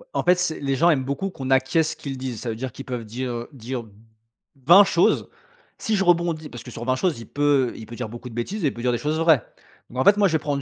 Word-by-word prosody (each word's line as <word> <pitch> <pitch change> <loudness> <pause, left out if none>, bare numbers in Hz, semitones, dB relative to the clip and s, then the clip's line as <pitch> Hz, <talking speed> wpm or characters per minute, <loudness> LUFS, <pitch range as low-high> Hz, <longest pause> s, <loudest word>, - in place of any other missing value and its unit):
En - - +2
fait, 180 +1 +5
c'est 175 -3 -1
les 135 -1 -1
gens 170 +5 +4
aiment 135 -4 +1
beaucoup 140 +9 -3
qu'on 135 -4 -6
acquiesce 135 +5 +2
ce - - -7
qu'ils 135 -2 -6
disent. 125 -4 -5
Ça 120 - -4
veut 110 - -3
dire 130 +2 -5
qu'ils 135 - -10
peuvent 125 -3 -4
dire, 120 +3 -4
heu, 120 0 -5
dire 125 -1 -5 0.8
20 180 +7 +9
choses. 175 -3 +2 0.5
Si 220 - 0
je 195 - +1
rebondis 170 -3 +1
parce 120 - -9
que 125 - -10
sur 120 +1 -7
20 130 0 +2
choses, 155 -4 -1
il 115 - -9
peut 145 -3 +1
il 110 - -9
peut 120 - -9
dire 125 -3 -5
beaucoup 120 +2 -9
de 115 - -12
bêtises 185 - -3
et - - +3
il - - -1
peut 120 - -8
dire 125 - +2
des 120 - 0
choses 150 +3 -1
vraies. 160 -7 +4 0.5
Donc, 125 - -6
en - - +1
fait, 200 - +7
moi, 200 -1 +4
je 165 - -2
vais 160 - +3
prendre 145 -2 -2
135 Hz, 295 wpm, -23 LUFS, 125-165 Hz, 0.8 s, 20